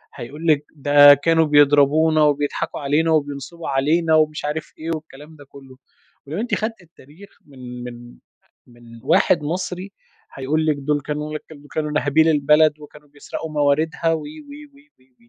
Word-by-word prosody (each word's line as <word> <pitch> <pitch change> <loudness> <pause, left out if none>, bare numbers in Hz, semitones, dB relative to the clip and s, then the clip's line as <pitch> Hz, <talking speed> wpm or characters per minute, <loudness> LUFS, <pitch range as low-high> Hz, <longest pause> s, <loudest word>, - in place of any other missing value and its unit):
هيقول 150 +7 -9
لِك 150 -2 +2
ده 145 0 +7
كانوا 160 +3 +2
بيضربونا 150 +2 +4
وبيضحكوا 145 -1 -1
علينا 150 +4 +1
وبينصبوا 145 +2 -3
علينا 160 +4 +1
ومش 155 -1 +1
عارف 150 +1 -5
إيه 160 +1 -6
والكلام 155 0 -12
ده 145 - -15
كلُّه، 135 -2 -15 0.5
ولو 160 +7 -5
أنتِ 235 +2 -1
خدتِ 220 -2 -4
التاريخ 165 +3 -18 0.2
من 125 -3 -10
من 120 0 -11 0.5
من 120 -1 -16
واحد 150 +3 +2
مصري، 180 +4 -4 0.4
هيقول 150 +4 -1
لِك 155 -1 +1
دول 145 +1 -1
كانوا 150 +2 -5 0.3
كانوا 150 -1 -3
ناهبين 155 +1 +2
البلد 150 0 +3
وكانوا 150 0 -15
بيسرقوا 145 +2 -8
مواردها 155 +3 0
و، 160 - -2
و، - - -9
و. 285 - -15
150 Hz, 145 wpm, -20 LUFS, 140-160 Hz, 0.5 s, ده